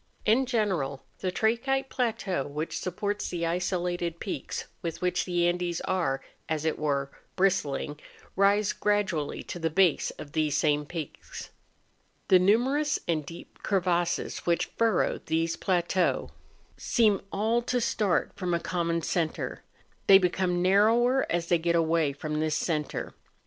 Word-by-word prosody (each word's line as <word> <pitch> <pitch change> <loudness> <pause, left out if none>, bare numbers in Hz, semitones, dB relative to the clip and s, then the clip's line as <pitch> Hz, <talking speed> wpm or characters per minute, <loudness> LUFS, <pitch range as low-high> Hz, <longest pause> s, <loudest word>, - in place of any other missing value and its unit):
In 250 +5 +3
general 185 - -1 0.2
the 185 - -1
trachytic 235 +8 0
plateau 220 - -1
which 150 +3 -4
supports 205 +3 -3
the 170 -1 -2
isolated 175 -1 -1
peaks 195 - -4 0.2
with 165 -2 -4
which 180 0 0
the 175 -1 +1
Andes 175 -1 -1
are, 165 -8 -1 0.3
as 155 -1 -1
it 160 - 0
were, 140 -2 -1 0.2
bristling, 150 -6 0 0.4
rise 200 +1 +3
gradually 195 -8 0
to 175 - -7
the 165 -1 0
base 175 0 +3
of 145 - -9
these 155 -2 +1
same 150 -1 +1
peaks. 160 -3 -7 0.8
The 185 - +7
numerous 260 +10 +2
and 160 -3 0
deep 165 +4 -12
crevasses 175 -3 0
which 170 -1 0
furrow 230 -1 +2
these 165 +1 0
plateaux 180 0 0 0.5
seem 215 -4 +2
all 220 +4 +1
to 245 +1 0
start 210 -6 +1
from 180 -2 -1
a - - 0
common 170 -1 -1
centre; 160 -1 -2 0.5
they 195 - +10
become 180 -1 +1
narrower 230 +7 +4
as 170 0 0
they 170 0 +2
get 170 +1 +1
away 165 -2 +2
from 150 +2 -4
this 155 -1 0
centre. 150 -4 -2
175 Hz, 140 wpm, -28 LUFS, 160-200 Hz, 0.8 s, they